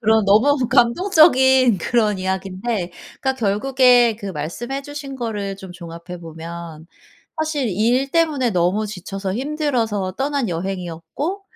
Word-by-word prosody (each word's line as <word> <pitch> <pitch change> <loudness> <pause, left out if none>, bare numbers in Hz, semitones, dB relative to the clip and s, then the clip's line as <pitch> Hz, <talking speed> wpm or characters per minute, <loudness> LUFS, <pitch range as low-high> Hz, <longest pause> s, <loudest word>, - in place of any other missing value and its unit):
그런 220 -1 +3
너무 250 +6 +3
감동적인 260 - +4
그런 210 +1 +1
이야기인데 190 +1 -3 0.3
그러니까 265 -1 0
결국에 245 +1 +3
그 205 - -8
말씀해 195 - -4
주신 280 -1 -7
거를 210 -5 -4
좀 190 -2 -10
종합해 170 0 -9
보면 165 0 -9 0.5
사실 305 -5 -1
일 240 +8 +1
때문에 305 -7 +1
너무 185 +3 +1
지쳐서 195 -1 -5
힘들어서 245 -8 -1
떠난 275 -1 -1
여행이었고 180 - -4
220 Hz, 300 characters per minute, -20 LUFS, 185-265 Hz, 0.5 s, 감동적인